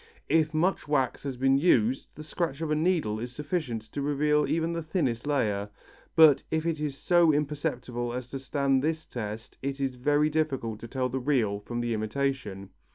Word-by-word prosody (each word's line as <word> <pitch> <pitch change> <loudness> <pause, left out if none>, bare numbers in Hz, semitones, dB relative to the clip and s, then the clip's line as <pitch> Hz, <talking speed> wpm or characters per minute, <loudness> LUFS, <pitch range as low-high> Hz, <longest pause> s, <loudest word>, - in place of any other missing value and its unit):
If 160 -1 +3
much 165 +3 0
wax 135 -4 +1
has 135 -3 -3
been 135 +1 +3
used 130 -6 +3
the 155 - -8
scratch 155 -2 -3
of 160 -2 -2
a - - +3
needle 155 -10 +1
is 120 +2 -5
sufficient 150 - -2
to 145 - -3
reveal 150 +1 +2
even 165 +1 0
the 170 - -2
thinnest 145 -7 -1
layer, 105 -8 0 0.5
but 160 -4 +7
if 160 0 -1
it 165 -2 -1
is 150 -2 -3
so 175 -1 +4
imperceptible 140 -5 -2
as 125 0 -5
to 135 - -4
stand 135 0 +1
this 160 +2 -1
test 110 -1 -6
it 140 +1 -3
is 135 -1 -1
very 145 +4 +2
difficult 135 -8 -1
to 115 - -8
tell 130 +1 -1
the 130 +2 -2
real 120 -7 +1
from 120 +3 -4
the 120 -1 -1
imitation. 110 -3 -2
140 Hz, 190 wpm, -28 LUFS, 120-155 Hz, 0.5 s, but